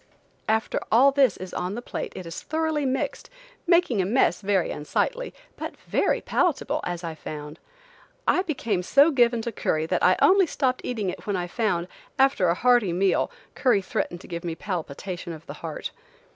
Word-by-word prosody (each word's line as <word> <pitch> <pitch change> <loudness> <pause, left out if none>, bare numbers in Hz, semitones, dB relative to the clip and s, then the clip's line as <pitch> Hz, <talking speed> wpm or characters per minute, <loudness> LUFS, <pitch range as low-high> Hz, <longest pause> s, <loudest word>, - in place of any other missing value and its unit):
After 220 0 +1
all 260 +5 +6
this 270 -6 +3
is 185 -1 -8
on 180 +3 -3
the - - -3
plate - - -5
it 185 - -7
is 165 0 -6
thoroughly 315 -2 -1
mixed, 260 +1 -2 0.4
making 340 - +4
a - - 0
mess 210 -5 +2
very 195 -3 +1
unsightly, - - -2 0.3
but - - -6
very - - +1
palatable, 350 -6 0
as 175 0 -4
I 165 -1 -4
found. 150 0 -8 0.7
I 365 - +4
became 245 - -1
so 280 - +5
given 240 -4 +3
to 235 - -3
curry 155 -6 -1
that 180 +2 0
I 185 - +5
only 380 -1 +5
stopped 260 -3 0
eating 215 -7 -2
it - - -11
when 205 - 0
I 180 -1 -1
found, 180 -3 -1 0.3
after 265 -10 +3
a 170 - +2
hearty 240 -5 +3
meal, 190 +2 +2 0.2
curry 240 -8 +2
threatened 175 -1 -3
to - - -13
give 170 -1 -5
me 170 -2 -3
palpitation 175 0 -5
of 160 0 -11
the - - -7
heart. 160 -2 -5
205 Hz, 185 wpm, -25 LUFS, 175-265 Hz, 0.7 s, all